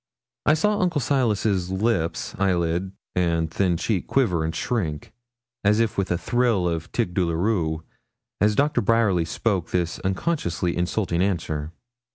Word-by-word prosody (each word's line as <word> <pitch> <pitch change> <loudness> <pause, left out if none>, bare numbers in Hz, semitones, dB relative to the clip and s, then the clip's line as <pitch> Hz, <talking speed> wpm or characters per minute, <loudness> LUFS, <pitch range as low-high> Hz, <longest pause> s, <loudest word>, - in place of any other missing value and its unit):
I 155 - +6
saw 210 +6 +1
Uncle 175 -6 +1
Silas's 110 -8 +1
lip, 95 -3 0 0.2
eyelid, 90 -1 +1 0.2
and 85 -3 +1
thin 90 0 +1
cheek 95 +1 -1
quiver 90 -12 +2
and 80 0 -2
shrink, 90 -5 -2 0.5
as 105 +2 +4
if 115 -2 +1
with 100 -1 -1
a 85 - +1
thrill 115 -1 +1
of 80 -2 -3
tic 90 - -1
douloureux, 85 -2 0 0.6
as 105 0 +3
Doctor 145 +3 +2
Bryerly 105 -6 +2
spoke 95 0 -1
this 85 -2 -1
unconsciously 95 - -1
insulting 90 0 0
answer. 80 -5 -1
95 Hz, 140 wpm, -24 LUFS, 85-115 Hz, 0.6 s, I